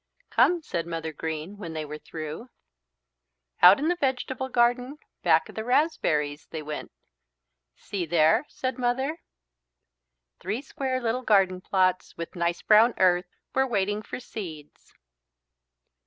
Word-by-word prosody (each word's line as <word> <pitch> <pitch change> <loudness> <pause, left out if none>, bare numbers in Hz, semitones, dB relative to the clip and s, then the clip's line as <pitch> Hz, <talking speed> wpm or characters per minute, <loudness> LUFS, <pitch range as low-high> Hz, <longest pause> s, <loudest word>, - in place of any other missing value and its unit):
"Come," 345 -2 +3
said 170 - -3
Mother 165 -1 -4
Green 160 +5 -5
when 170 -5 -7
they 155 -1 -4
were 150 +1 -7
through. 155 +12 -7 1.1
Out 180 +3 +9
in 295 - -1
the 350 - +2
vegetable 265 -3 -2
garden, 245 +3 +1 0.2
back - - +3
of - - -12
the 220 - -4
raspberries 155 - +1
they 155 -1 -6
went. 150 0 -6 0.8
"See 185 -4 -4
there," 160 - +4
said 260 -2 -4
Mother. 265 +5 0 1.2
Three 210 +9 -3
square 265 -2 -2
little 240 +1 -1
garden 195 -5 +3
plots 185 -1 0
with 170 +2 -6
nice 170 0 -1
brown 225 +3 +5
earth 180 -1 +3 0.3
were 265 0 +2
waiting 205 -2 0
for 215 - -7
seeds. 165 - -9
200 Hz, 135 wpm, -26 LUFS, 165-255 Hz, 1.2 s, Out